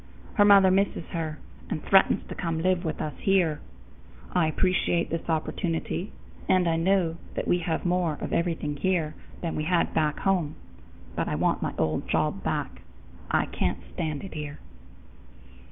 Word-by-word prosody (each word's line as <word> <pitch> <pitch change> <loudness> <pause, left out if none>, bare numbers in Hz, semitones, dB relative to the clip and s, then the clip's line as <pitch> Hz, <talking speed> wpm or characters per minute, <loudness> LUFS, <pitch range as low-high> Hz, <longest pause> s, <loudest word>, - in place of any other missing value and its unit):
Her 205 - +5
mother 195 -2 +7
misses 195 -3 +1
her 160 -2 -3 0.3
and 155 - -3
threatens 195 -1 +4
to - - -6
come 165 -2 -2
to 160 - -3
live 185 -1 +2
with 160 - -3
us 150 - -3
here. 175 -6 +2 0.7
I 175 -3 +3
appreciate 175 +1 +1
this 165 +1 -3
opportunity, 165 +3 -2 0.4
and 185 -2 +4
I 165 - +2
know 170 -1 +2 0.2
that - - -2
we 175 - +3
have 165 0 -2
more 175 -4 +1
of - - -4
everything 165 -4 -1
here 165 -1 0 0.3
than 165 -2 -2
we 155 - -2
had 175 0 +1
back 150 -2 +1
home, 180 -6 +1 0.6
but - - -1
I - - -1
want - - +1
my - - -2
old 80 -1 0
job - - +1
back. - - -3 0.5
I - - +2
can't - - -1 0.2
stand 155 -4 -3
it 195 - -8
here." 150 -1 -5
170 Hz, 170 wpm, -27 LUFS, 155-185 Hz, 0.7 s, mother